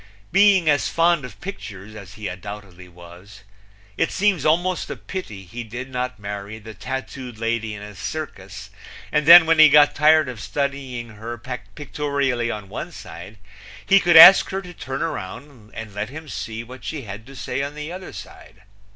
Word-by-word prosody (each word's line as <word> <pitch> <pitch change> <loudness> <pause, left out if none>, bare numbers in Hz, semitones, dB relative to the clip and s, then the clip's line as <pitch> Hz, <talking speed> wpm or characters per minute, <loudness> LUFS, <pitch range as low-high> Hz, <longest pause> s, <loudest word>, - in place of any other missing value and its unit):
Being 195 -4 +4
as 145 -1 +2
fond 170 -2 +2
of 105 -6 -12
pictures 110 - -8
as 100 -3 -11
he 110 -2 -6
undoubtedly 95 -1 -9
was, 90 +3 -15 0.5
it - - +1
seems 190 -6 +1
almost 175 +3 0
a - - -4
pity 110 - -8
he 120 +7 -7
did 120 +4 -8
not 125 -2 -3
marry 100 +1 -7
the 110 0 -11
tattooed 125 -1 -7
lady 115 -1 -2
in 100 - -9
a 105 0 -10
circus 100 - -7 0.4
and 150 -1 0
then 170 0 +11
when 165 0 +2
he 155 -1 +9
got 145 0 +6
tired 155 0 +4
of 125 -3 -7
studying 130 +1 -4
her 115 +2 -7
pictorially 130 0 -3
on 105 -3 -6
one - - -7
side 105 +2 -11 0.5
he 195 0 +5
could 175 -3 +5
ask 190 +4 +10
her 195 +1 -4
to 180 -1 -11
turn 135 -2 -5
around 125 - -7
and 110 -3 -8
let 105 +2 -4
him 155 +3 -10
see 115 -4 -6
what 125 +2 -12
she 150 -4 -5
had 105 +2 -9
to 135 - -12
say 135 - -4
on 140 +1 -5
the 150 +2 -6
other 185 +1 -8
side. - - -13
125 Hz, 180 wpm, -22 LUFS, 105-155 Hz, 0.5 s, then